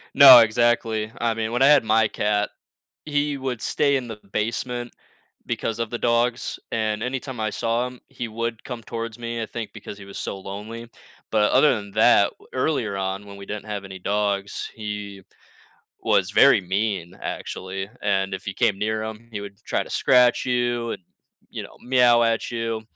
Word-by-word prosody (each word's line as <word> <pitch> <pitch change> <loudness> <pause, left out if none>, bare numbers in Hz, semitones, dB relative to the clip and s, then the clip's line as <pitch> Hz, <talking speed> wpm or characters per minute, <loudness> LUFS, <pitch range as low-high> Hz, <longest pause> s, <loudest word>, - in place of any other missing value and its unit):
No, 135 -3 +11
exactly. 115 -1 +2
I 115 -1 +2
mean, 110 0 -3
when 120 - -1
I 135 - +7
had 145 -3 +6
my 110 0 +3
cat, 105 0 0 0.6
he 145 -1 0
would 130 -4 -4
stay 140 -1 +2
in 125 -2 -3
the 110 -2 -7
basement 120 +2 -2 0.5
because 115 0 -2
of 115 -2 -2
the 120 - -3
dogs, 120 0 0
and 110 -1 -1
anytime 130 -1 -4
I 110 - 0
saw 115 +4 0
him, 125 -1 -13
he 120 - -6
would 115 +1 -4
come 120 -3 -6
towards 115 -1 -5
me, 115 -1 -4
I - - -3
think, 115 -1 -6
because 100 - -9
he 100 - -10
was 100 - -11
so 100 - -4
lonely, 105 +4 -8 0.4
but 105 -1 +3
other 150 - +5
than 100 -3 -6
that, 110 -1 +5
w - - -20
earlier 130 -6 0
on, 95 +1 -3
when 100 - -10
we 100 - -9
didn't 105 0 -5
have 105 -2 -4
any 95 -1 -8
dogs, 100 0 -1
he 105 -2 -6 0.8
was - - +2
very - - +6
mean, 95 -2 -2
actually, 95 +2 -5
and 95 -1 0
if 95 - -5
you 100 - -3
came 95 - +1
near 110 +1 -1
him, 110 +1 -7
he 105 - -4
would 100 -1 -10
t - - -33
try - - 0
to - - -12
scratch 125 -1 +4
you, 120 -1 0
and, - - -8 0.5
you - - -5
know, - - -12
meow 125 -2 +4
at 115 -1 0
you. 115 -2 -3
110 Hz, 190 wpm, -23 LUFS, 105-120 Hz, 0.8 s, No